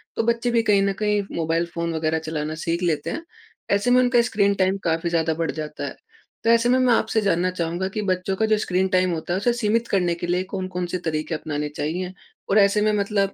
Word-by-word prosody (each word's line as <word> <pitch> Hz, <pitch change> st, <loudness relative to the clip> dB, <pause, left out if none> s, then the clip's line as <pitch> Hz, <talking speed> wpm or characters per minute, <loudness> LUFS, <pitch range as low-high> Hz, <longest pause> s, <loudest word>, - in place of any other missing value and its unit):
तो -, -, 0 dB
बच्चे 235 Hz, +1 st, +1 dB
भी 235 Hz, -, +3 dB
कहीं 205 Hz, -2 st, +3 dB
न 195 Hz, 0 st, +1 dB
कहीं 210 Hz, -1 st, +1 dB
मोबाइल 165 Hz, +1 st, 0 dB
फ़ोन 170 Hz, 0 st, -2 dB
वग़ैरह 160 Hz, 0 st, 0 dB
चलाना 155 Hz, -1 st, -4 dB
सीख 170 Hz, +1 st, -1 dB
लेते 155 Hz, -4 st, 0 dB
हैं। 330 Hz, -, -4 dB, 0.5 s
ऐसे 200 Hz, +5 st, +2 dB
में 250 Hz, -, +6 dB
उनका 245 Hz, -1 st, +4 dB
स्क्रीन 200 Hz, -4 st, +2 dB
टाइम 190 Hz, 0 st, +1 dB
काफ़ी 165 Hz, +1 st, 0 dB
ज़्यादा 165 Hz, -1 st, +1 dB
बढ़ 165 Hz, +1 st, -2 dB
जाता 155 Hz, -1 st, -5 dB
है। -, -, -6 dB, 0.5 s
तो 225 Hz, -, +2 dB
ऐसे 235 Hz, +1 st, +4 dB
में 255 Hz, -, +4 dB
मैं 255 Hz, -2 st, +4 dB
आपसे 220 Hz, -1 st, +1 dB
जानना 185 Hz, -2 st, +1 dB
चाहूँगा 175 Hz, +1 st, -2 dB
कि 210 Hz, +2 st, -3 dB
बच्चों 185 Hz, +1 st, 0 dB
का 220 Hz, -, +1 dB
जो 215 Hz, 0 st, +3 dB
स्क्रीन 190 Hz, -2 st, 0 dB
टाइम 185 Hz, 0 st, +3 dB
होता 165 Hz, +2 st, -3 dB
है -, -, +1 dB
उसे 240 Hz, +4 st, +2 dB
सीमित 230 Hz, 0 st, 0 dB
करने 180 Hz, -5 st, +1 dB
के 175 Hz, +1 st, -5 dB
लिए 180 Hz, +1 st, +1 dB
कौन-कौन 185 Hz, -2 st, -4 dB
से -, -, +1 dB
तरीके 155 Hz, 0 st, -2 dB
अपनाने 150 Hz, -1 st, -3 dB
चाहिए? 175 Hz, +5 st, -3 dB, 0.4 s
और 200 Hz, -, +3 dB
ऐसे 200 Hz, +1 st, +4 dB
में 215 Hz, 0 st, +3 dB
मतलब 200 Hz, -1 st, 0 dB
185 Hz, 235 wpm, -23 LUFS, 165-210 Hz, 0.5 s, में